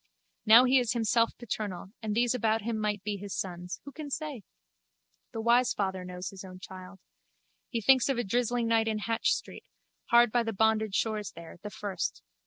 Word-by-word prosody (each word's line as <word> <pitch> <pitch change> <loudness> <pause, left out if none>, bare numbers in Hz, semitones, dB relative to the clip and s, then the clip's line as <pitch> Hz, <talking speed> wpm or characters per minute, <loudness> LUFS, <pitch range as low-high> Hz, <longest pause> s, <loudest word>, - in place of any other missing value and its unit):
Now 230 +3 +9
he 255 +1 +5
is 245 -1 0
himself 230 0 +1
paternal 205 -5 -5
and 215 -2 -2
these 240 +1 +2
about 225 -2 +1
him 225 0 -2
might 210 -2 -1
be 205 -1 -2
his 200 0 -6
sons. 180 -1 -5
Who 280 - -8
can 300 0 -7
say? 295 -4 -4 0.9
The 225 - -4
wise 240 +2 +3
father 190 -2 -2
knows 180 0 -6
his 195 -1 -10
own 185 -1 -10
child. 185 +1 -10 0.7
He 230 - -2
thinks 260 +3 +5
of 270 - +1
a 240 - 0
drizzling 240 +2 0
night 225 -1 +2
in 220 -1 0
Hatch 225 +2 0
street, - - -4 0.4
hard 235 -1 +5
by 240 - +3
the 225 -1 -3
bonded 220 0 +2
stores 215 -2 -1
there, 170 0 -11
the 210 - -6
first. 200 - -4
220 Hz, 195 wpm, -29 LUFS, 195-235 Hz, 0.9 s, Now